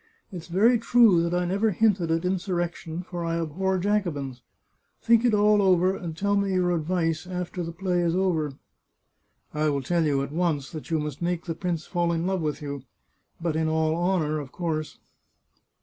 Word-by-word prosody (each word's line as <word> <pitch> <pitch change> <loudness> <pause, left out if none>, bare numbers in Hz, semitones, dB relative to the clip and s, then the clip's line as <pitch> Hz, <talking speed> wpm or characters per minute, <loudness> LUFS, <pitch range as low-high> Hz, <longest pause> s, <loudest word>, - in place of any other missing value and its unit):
It's 175 -3 -8
very 220 +7 +4
true 230 -6 +5
that 170 0 -1
I 180 0 +1
never 200 +5 +1
hinted 195 -4 +2
at 165 +2 0
in 185 +1 +1
surrection, 175 -2 -3
for 175 -2 -5
I 165 0 -1
abhor 185 +4 -1
Jacobins. 175 - -1 0.6
Think 230 0 +4
it 240 -3 +3
all 210 0 +4
over, 185 0 +3
and 165 -4 -6
tell 200 +2 +1
me 200 -1 +1
your 180 -1 +2
advice, 165 0 -1
after 180 0 -4
the 170 -1 -4
play 180 +1 -1
is 170 0 +1
over." 165 -6 0 0.5
" - - -45
I 150 0 +1
will 140 -2 -1
tell 170 +5 +1
you 140 -3 +1
at 140 - -6
once 155 -4 -1
that 155 -2 -8
you 165 - +1
must 150 -1 -4
make 175 -1 -1
the 165 - -2
prince 170 -1 -3
fall 175 -2 0
in 165 0 -1
love 190 -1 0
with 150 -1 -3
you... 140 -1 -5 0.6
but 165 -2 -2
in 160 0 +1
all 160 0 +1
honour, 170 -3 0
of 140 -3 -8
course 155 -3 -3
175 Hz, 195 wpm, -26 LUFS, 160-185 Hz, 0.6 s, true